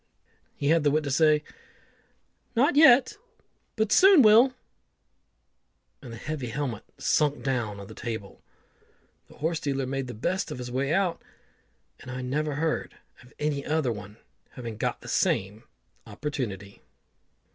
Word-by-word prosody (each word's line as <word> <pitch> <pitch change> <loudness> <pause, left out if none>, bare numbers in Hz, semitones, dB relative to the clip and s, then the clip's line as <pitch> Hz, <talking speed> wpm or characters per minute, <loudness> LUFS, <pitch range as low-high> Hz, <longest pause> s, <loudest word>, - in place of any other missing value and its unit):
He 140 - -1
had 165 -1 +3
the 145 - +4
wit 155 +2 +1
to 140 - -3
say, 150 +1 +3 1.1
"Not 270 +5 +3
yet, 270 -4 +6 0.6
but 220 -2 0
soon 380 -7 +7
will," 230 +5 +6 1.5
and 125 -5 -10
the 115 - -8
heavy 145 +1 -5
helmet 120 -2 -4
sunk 150 -1 +1
down 120 -7 -2
on 100 - -8
the - - -11
table. 110 -4 -7 0.9
The - - -17
horse 160 +2 -1
dealer 135 -2 -2
made 135 0 -3
the 120 - -7
best 185 - -2
of - - -6
his 125 -1 -6
way 135 +3 -1
out, 185 -1 0 0.8
and 130 - -12
I 130 0 -5
never 145 +3 -2
heard 160 +2 -2 0.2
of 125 +1 -18
any 150 -2 -2
other 150 -5 0
one 105 -1 -8 0.4
having 115 -4 -7
got - - -3
the - - -12
same 100 +3 -1 0.4
opportunity. 100 -10 -5
140 Hz, 145 wpm, -27 LUFS, 120-160 Hz, 1.5 s, soon